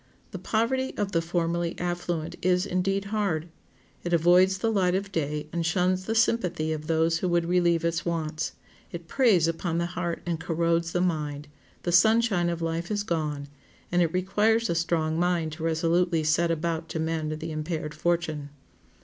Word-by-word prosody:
The - - -6
poverty 260 +4 0
of 205 -1 -1
the 165 - +1
formerly 170 0 -1
affluent 175 -2 -3
is, 180 +1 +2
indeed, 195 +1 0
hard; 175 -6 -1 0.5
it 175 - -2
avoids 180 +3 +5
the 225 +4 0
light 185 -4 +2
of 195 - 0
the 200 - -14
day 150 -2 -2
and 170 -1 -1
shuns 185 +3 +1
the 225 - -1
sympathy 180 -9 +1
of 155 0 -6
those 165 0 +2
who 185 - -1
would 175 -1 +2
relieve 170 -1 +2
its 165 0 0
wants; 160 -2 -2 0.4
it 170 -1 -7
preys 210 - +3
upon 165 0 -2
the 170 - 0
heart 175 -1 -3
and 170 -2 -2
corrodes 165 0 0
the 175 - 0
mind; 150 -4 -2 0.4
the 175 - -1
sunshine 200 -1 +4
of 170 -1 -3
life 165 +1 -2
is 205 -1 -1
gone, 150 -6 -2 0.4
and 175 0 +3
it 165 -2 +2
requires 210 +4 +2
a - - +2
strong 165 -1 0
mind 175 -2 +1
to 155 +1 -7
resolutely 165 +1 +1
set 165 +2 +2
about 165 0 -2
to 160 - -3
mend 160 -1 -1
the 160 +1 -5
impaired 155 0 -3
fortune. 155 -2 -1
170 Hz, 180 wpm, -27 LUFS, 160-180 Hz, 0.5 s, avoids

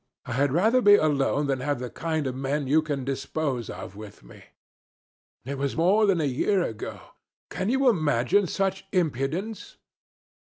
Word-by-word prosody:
I - - -7
had 140 +2 +1
rather 220 - +3
be 205 -2 +7
alone 145 -3 +1
than 135 -2 -1
have 145 +3 -1
the 125 0 -6
kind 160 -3 -2
of 130 - -2
men 135 +3 -2
you 150 +4 +3
can 145 -4 -4
dispose 135 -2 -3
of 100 - -8
with 105 - -11
me." - - -15 1.0
It 140 +1 -5
was 140 +1 -2
more 200 +6 +4
than 190 -4 +2
a - - 0
year 175 +8 +1
ago. 110 -8 -5 0.5
Can 190 +3 -2
you 265 +2 +2
imagine 155 - +2
such 195 +1 -2
impudence!' 170 - -2
150 Hz, 165 wpm, -26 LUFS, 135-190 Hz, 1.0 s, be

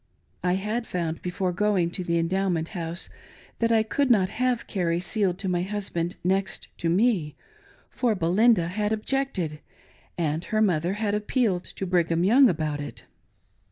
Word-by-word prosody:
I 180 0 +2
had 215 +5 -2
found 165 -2 -3
before 180 0 -2
going 185 -3 +1
to 185 - -3
the 170 -1 0
Endow 190 +4 +1
ment 165 -2 -1
House 170 -3 -3 0.5
that 230 0 +2
I 220 -1 +4
could 275 +5 0
not 195 -6 +4
have 250 +2 0
Carrie 170 -4 0
sealed 185 0 0
to 195 - -3
my 180 -1 +1
hus 205 +2 -3
band 170 +1 -2
next 190 +2 -1
to 165 - 0
me, 180 -5 +2 0.6
for 235 -4 +1
Belinda 185 +2 +3
had 210 +3 -1
objected, 215 - -1 0.6
and 160 -1 -1
her 215 - 0
mother 180 -4 +2
had 210 0 -1
appealed 210 -3 0
to 195 - -6
Brigham 170 -2 +1
Young 245 +7 +6
about 155 -4 -1
it. 145 - -8
185 Hz, 165 wpm, -26 LUFS, 170-215 Hz, 0.6 s, Young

